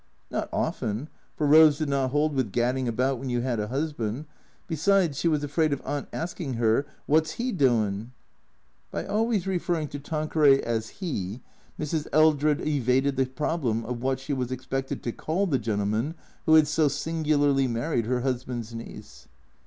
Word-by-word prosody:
Not - - -2
often; 110 +8 -2 0.3
for 150 - -1
Rose 150 0 +7
did 155 -1 -1
not 135 -2 +1
hold 150 +3 +1
with 130 -7 -1
gad 120 +3 +2
ding 130 -1 -2
about 125 +3 0
when 135 +1 -5
you 120 -1 0
had 120 -2 -1
a 105 - -2
husband; 135 -1 -3 0.4
besides, 165 -1 +2
she - - +1
was 150 -3 +1
afraid 155 +2 +1
of 140 - -1
Aunt 145 -1 -3
asking 165 -4 -4
her, 115 +4 +2
" - - -35
Wot's 155 +4 +2
'E 250 +2 0
doin'? 115 - +1 0.4
" - - -41 0.2
(By - - -3
always 220 -3 0
referring 175 -5 -1
to 145 - -6
Tanqueray 150 -2 +3
as 115 -1 -2
" - - -25
'E," 105 - -3 0.4
Mrs. 155 0 -2
Eldred 155 -1 +3
evaded 135 -1 +2
the 130 0 +1
problem 130 -5 -1
of 120 0 -4
what 130 0 0
she 140 +2 -4
was 130 -2 -2
expected 135 +1 -3
to 120 - -1
call 170 - -1
the 145 -9 +1
gentleman 110 +6 -1 0.3
who 160 - +7
had 155 -1 +6
so 155 0 +2
singularly 145 -2 +1
married 120 0 -1
her 125 0 0
husband's 125 -3 -3
niece.) 115 0 -10
140 Hz, 180 wpm, -26 LUFS, 120-155 Hz, 0.4 s, Rose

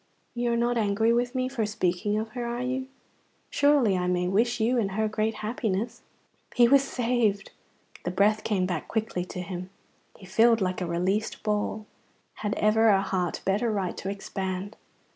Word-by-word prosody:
You 240 0 0
are 235 - +1
not 240 0 +1
angry 220 +2 +2
with 245 +2 0
me 255 0 0
for 255 -4 -2
speaking 205 0 0
of 220 +1 -2
her, 245 +2 -5
are 240 +1 -3
you? 260 +1 -2 0.6
Surely 285 -8 +4
I 180 -1 0
may 180 0 +1
wish 235 +6 +1
you 240 +3 +2
and 195 -4 -1
her 220 +2 +1
great 215 +1 -1
happiness." 220 -1 -2 0.5
He 240 -1 +6
was 275 +2 +5
saved. 235 -6 0 0.5
The - - -2
breath 210 +4 +2
came 195 -4 +1
back 175 -4 -3
quickly 220 -5 -2
to 180 - -6
him. 180 0 -6 0.5
He 190 - -13
filled 225 +4 +4
like 185 -2 -1
a 180 - -1
released 185 +5 -1
ball. 210 0 -1 0.6
Had 210 -1 -1
ever 220 +1 +3
a 195 -2 +4
heart 180 -3 -2
better 205 +5 +1
right 195 -4 -2
to 190 - -4
expand? 195 0 -4
215 Hz, 180 wpm, -27 LUFS, 190-235 Hz, 0.6 s, He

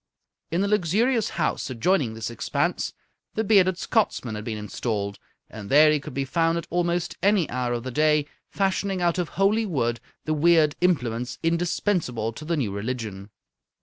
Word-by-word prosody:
In 175 +4 0
a - - +1
luxurious 210 +5 +2
house 155 -4 -1
adjoining 130 -1 +1
this 115 +1 -4
expanse 115 - -1 0.4
the 220 - +1
bearded 190 -4 +4
Scotsman 180 - 0
had 105 0 -5
been 110 -1 -4
installed, 105 -1 -3 0.3
and 105 -2 -9
there 150 +2 +7
he 150 - +2
could 140 - -9
be 135 0 -1
found 165 +3 +1
at 170 - -4
almost 175 0 -1
any 200 -4 +3
hour 125 -1 -1
of 120 -1 -3
the 130 - -5
day 150 +1 +3 0.2
fashioning 195 -1 0
out 175 0 +1
of 175 - -1
holy 210 +3 +3
wood 120 -9 -1 0.3
the 155 - 0
weird 155 -1 +4
implements 125 -8 0
indispensable 165 - 0
to 155 - -9
the 165 +1 -1
new 120 -9 -1
religion. 100 -2 -5
155 Hz, 170 wpm, -25 LUFS, 120-180 Hz, 0.4 s, there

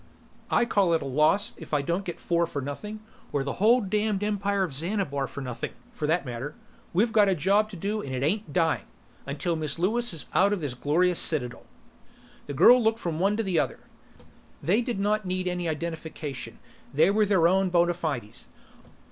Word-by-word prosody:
"I - - +3
call 195 -7 +2
it 160 - -1
a - - -6
loss 155 +9 +2
if - - -4
I 145 - +1
don't 175 +6 -2
get 175 - -5
four 170 -1 +1
for 145 - -4
nothing 210 +11 -6 0.3
or 140 - 0
the 140 - -3
whole 235 +4 +5
damned 210 0 -1
Empire 200 -1 0
of 170 -7 -3
Xanabar 150 -3 -1
for 140 - -8
nothing, 125 -3 -5 0.2
for 150 - -3
that 165 0 +1
matter. 125 +4 -5 0.4
We've 220 +6 +1
a 200 -3 +5
job 200 +7 +2
to 210 - -9
do 205 +5 -2
and 135 - -7
it 130 - -2
ain't 200 +4 -1
dying 165 0 +1 0.4
until 150 +5 -2
Miss 155 -2 -3
Lewis 230 +8 +1
is 165 -4 -3
out 200 +2 +4
of 205 - -1
this 145 -6 -3
glorious 165 +7 +2
citadel." 125 -6 +1 0.8
The 145 - -5
girl 245 - +7
looked 220 0 +2
from 170 -7 -3
one 200 +3 +2
to 225 - 0
the 185 -5 +1
other. - - -1 0.9
They 200 +8 +3
did 240 -4 -3
not 210 0 0
need 185 0 -1
any 180 -1 -1
identification; 155 -5 -5 0.3
they 160 +7 +4
were 210 0 +2
their 185 -5 +4
own 190 +1 +2
bona 175 0 +3
fides. 145 -11 -4
175 Hz, 195 wpm, -26 LUFS, 150-205 Hz, 0.9 s, girl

